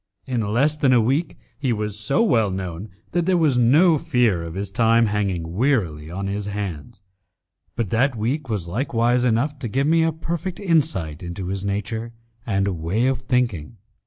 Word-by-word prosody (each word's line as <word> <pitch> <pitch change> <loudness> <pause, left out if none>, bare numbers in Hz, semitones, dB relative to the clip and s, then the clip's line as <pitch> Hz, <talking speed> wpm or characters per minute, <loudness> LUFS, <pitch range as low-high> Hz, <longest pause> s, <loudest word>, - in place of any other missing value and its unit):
In 125 -3 -1
less 120 +9 +1
than 140 -4 +3
a 125 - +5
week 135 +9 0 0.2
he 135 -4 0
was 105 -2 -2
so 135 - +2
well 115 - +3
known 95 +1 -5 0.2
that 175 0 0
there 185 -1 +3
was 155 -6 +3
no 150 +7 +5
fear 125 - +1
of 85 0 -7
his 100 0 -4
time 115 +2 +3
hanging 95 -6 -2
wearily 95 - 0
on 95 +3 -4
his 100 +1 -3
hands, 100 +1 -6 0.7
but 115 -5 -2
that 125 +3 +2
week 130 +6 -2
was 100 -6 -2
likewise 120 +3 +1
enough 130 +5 0
to 130 - -4
give 135 +6 0
me 165 +2 +3
a 165 0 +2
perfect 170 +3 -4
insight 150 - 0
into 90 +1 -5
his 95 0 -3
nature 110 +3 -3 0.3
and 100 -2 +1
way 95 +10 0
of 130 -2 +1
thinking. 120 - -1
115 Hz, 180 wpm, -22 LUFS, 100-135 Hz, 0.7 s, a